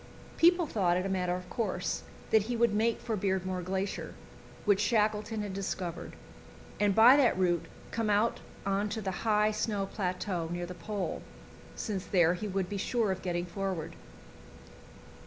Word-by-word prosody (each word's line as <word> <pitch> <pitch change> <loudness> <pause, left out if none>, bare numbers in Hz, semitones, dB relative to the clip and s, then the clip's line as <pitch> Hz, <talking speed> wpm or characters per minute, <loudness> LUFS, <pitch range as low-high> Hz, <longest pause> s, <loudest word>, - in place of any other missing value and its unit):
People 345 +1 +5
thought 180 - +1
it 185 - -1
a - - -1
matter 180 -2 0
of 180 0 -7
course 190 -6 -2 0.3
that 220 - +6
he 240 +4 -3
would 235 -2 +3
make 225 +2 +1
for 225 - -2
Beardmore 185 -2 -1
Glacier, 190 +2 -3 0.5
which 205 -2 +4
Shackleton 215 0 +1
had 200 -2 -5
discovered, 185 -3 -4 0.7
and 205 -2 +3
by 235 +4 +9
that 260 -8 +4
route 175 -2 +1 0.2
come 225 -2 -1
out 210 +3 +2 0.3
on 200 +1 0
to 220 +2 -3
the 195 -3 -2 0.2
high 210 0 +4
snow 210 -2 -1
plateau 180 -3 -2
near 175 0 -3
the 180 - -7
Pole, 205 +1 -4 0.5
since 200 -5 -3
there 175 -4 +3
he 180 +4 -4
would 190 -2 -1
be 200 - -4
sure 220 +1 0
of 185 - -3
getting 175 -1 -2
forward. 185 -3 -4
195 Hz, 165 wpm, -30 LUFS, 185-215 Hz, 0.7 s, by